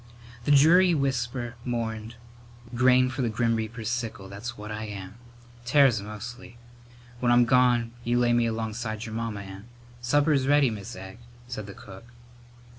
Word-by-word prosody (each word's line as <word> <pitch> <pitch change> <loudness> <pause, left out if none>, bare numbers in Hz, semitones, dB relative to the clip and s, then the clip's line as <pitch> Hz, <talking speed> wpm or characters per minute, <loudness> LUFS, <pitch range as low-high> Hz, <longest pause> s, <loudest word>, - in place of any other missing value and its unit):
The - - +2
dreary 170 +5 +6
whisper 125 -3 -2
mourned, 115 -2 -4 0.6
"Grain 125 +1 +4
for 130 +1 -3
the 120 - +1
grim 115 +1 +1
reaper's 110 0 -4
sickle, 115 -5 -4
that's 115 +5 -7
what 105 +1 -8
I 110 +1 -4
am. 100 0 -8 0.5
Tares 125 -3 +4
mostly. 115 +4 -9 0.6
When 120 -1 +2
I'm 120 0 +5
gone 120 -2 +3
you 120 +1 +1
lay 120 -1 +3
me 120 -1 +3
alongside 110 0 -4
your 110 - -7
mamma 115 -2 -3
and 95 +1 -10 0.2
" 120 0 -23
"Supper's 145 -2 +3
ready, 145 -3 +4
Mis' 105 -3 -7
Egg," 95 +3 -10 0.3
said 105 -4 -6
the 100 - -10
cook. 95 +2 -12
120 Hz, 160 wpm, -26 LUFS, 110-125 Hz, 0.6 s, dreary